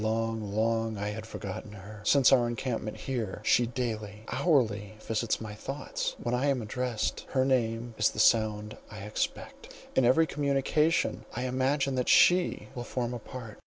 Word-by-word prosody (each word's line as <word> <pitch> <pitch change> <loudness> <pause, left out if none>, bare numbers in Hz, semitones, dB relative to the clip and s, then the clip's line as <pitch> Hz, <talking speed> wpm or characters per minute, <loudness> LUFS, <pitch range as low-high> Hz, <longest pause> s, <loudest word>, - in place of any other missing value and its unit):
Long, 110 -1 -1
long 115 0 +1
I 105 +1 -2
had 110 +1 -6
forgotten 100 0 -7
her. 105 +1 -10
Since 135 +3 +5
our 125 -3 +5
encampment 120 -2 -3
here, 115 -8 -3
she 120 - +4
daily, 110 -4 -4
hourly 110 - +1
visits 110 +1 -1
my 110 -2 -6
thoughts. 135 +6 -4
When 120 - -3
I 125 +3 +1
am 135 -2 +2
addressed, 120 +1 -2
her 130 -1 +3
name 120 -2 0
is 110 - +4
the - - -11
sound 110 -1 +2
I 105 -1 -9
expect: 105 +1 -4 0.2
in 130 - +4
every 130 +7 +5
communication, 145 +2 +1
I 125 - -2
imagine 130 +2 +1
that 125 - 0
she 175 -11 +4
will 120 - -5
form 120 0 -3
a 120 - -4
part. 115 -2 -9
115 Hz, 165 wpm, -29 LUFS, 110-130 Hz, 0.2 s, Since